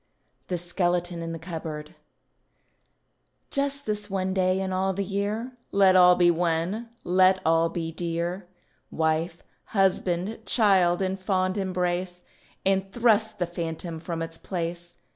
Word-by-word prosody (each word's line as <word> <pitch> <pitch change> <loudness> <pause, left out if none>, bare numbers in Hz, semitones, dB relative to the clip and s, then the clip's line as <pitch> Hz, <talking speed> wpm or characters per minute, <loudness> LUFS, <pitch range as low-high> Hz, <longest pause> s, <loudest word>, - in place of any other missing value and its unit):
THE 180 - -1
SKELETON 175 0 -1
IN 165 0 -4
THE 165 - -4
CUPBOARD 160 -2 -6 1.6
Just 280 0 -1
this 210 -1 -3
one 190 -1 -1
day 185 0 +2
in 190 -1 -2
all 190 +1 +1
the 200 +2 -2
year 205 +5 -2 0.2
Let 195 -2 +5
all 180 -1 +8
be 175 -1 +5
one, 175 +7 -1
let 185 +1 +4
all 165 +1 +3
be 165 -1 -4
dear; 170 +2 -3 0.4
Wife, 160 +2 -1 0.3
husband, 190 +2 +1
child 190 -5 +3
in 190 0 -1
fond 185 0 0
embrace, 180 -2 -2 0.4
And 195 0 +1
thrust 220 -2 +2
the 180 - 0
phantom 165 -1 -5
from 165 0 -4
its 165 0 -8
place. 175 -1 -5
180 Hz, 135 wpm, -26 LUFS, 170-195 Hz, 1.6 s, all